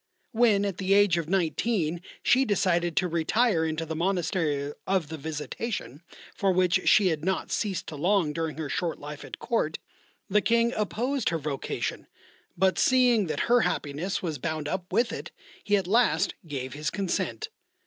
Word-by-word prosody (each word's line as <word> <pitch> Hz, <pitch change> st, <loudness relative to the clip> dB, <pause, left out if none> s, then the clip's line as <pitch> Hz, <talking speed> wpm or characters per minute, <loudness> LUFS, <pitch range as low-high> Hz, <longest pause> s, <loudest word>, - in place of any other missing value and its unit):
When 220 Hz, -4 st, +3 dB
at 195 Hz, -3 st, -3 dB
the 195 Hz, +1 st, +2 dB
age 200 Hz, -5 st, +4 dB
of 165 Hz, -1 st, -5 dB
nineteen 175 Hz, -1 st, 0 dB, 0.2 s
she 260 Hz, +2 st, +4 dB
decided 175 Hz, -6 st, +1 dB
to 180 Hz, -, +3 dB
retire 170 Hz, +3 st, +2 dB
into 160 Hz, 0 st, -2 dB
the 160 Hz, 0 st, -4 dB
Monastery 160 Hz, -5 st, 0 dB
of 185 Hz, -6 st, 0 dB
the 160 Hz, -, -5 dB
Visitation, 155 Hz, -, -5 dB, 0.3 s
for 195 Hz, -1 st, +1 dB
which 185 Hz, 0 st, +2 dB
she 200 Hz, -3 st, +5 dB
had 155 Hz, -2 st, -2 dB
not 190 Hz, +2 st, -1 dB
ceased 200 Hz, -4 st, -1 dB
to 155 Hz, -, -7 dB
long 170 Hz, 0 st, +1 dB
during 160 Hz, -1 st, -3 dB
her 160 Hz, -2 st, -3 dB
short 170 Hz, +3 st, -2 dB
life 145 Hz, 0 st, -8 dB
at -, -, -8 dB
Court, 190 Hz, -10 st, -1 dB, 0.5 s
the 210 Hz, +2 st, +3 dB
King 235 Hz, +2 st, +2 dB
opposed 240 Hz, +5 st, -1 dB
her 165 Hz, -, -1 dB
vocation, 145 Hz, -3 st, -4 dB, 0.5 s
but 185 Hz, 0 st, +2 dB
seeing 245 Hz, -6 st, +4 dB
that 155 Hz, -2 st, -2 dB
her 245 Hz, +1 st, +4 dB
happiness 155 Hz, +6 st, -2 dB
was 160 Hz, -5 st, -3 dB
bound 155 Hz, 0 st, -3 dB
up 180 Hz, +2 st, -4 dB
with 235 Hz, 0 st, +1 dB
it -, -, -6 dB, 0.3 s
he 205 Hz, 0 st, +3 dB
at 195 Hz, -, -2 dB
last 230 Hz, +6 st, +2 dB
gave 130 Hz, -3 st, -5 dB
his 150 Hz, +1 st, -2 dB
consent. 200 Hz, -, -2 dB
180 Hz, 170 wpm, -27 LUFS, 155-205 Hz, 0.5 s, she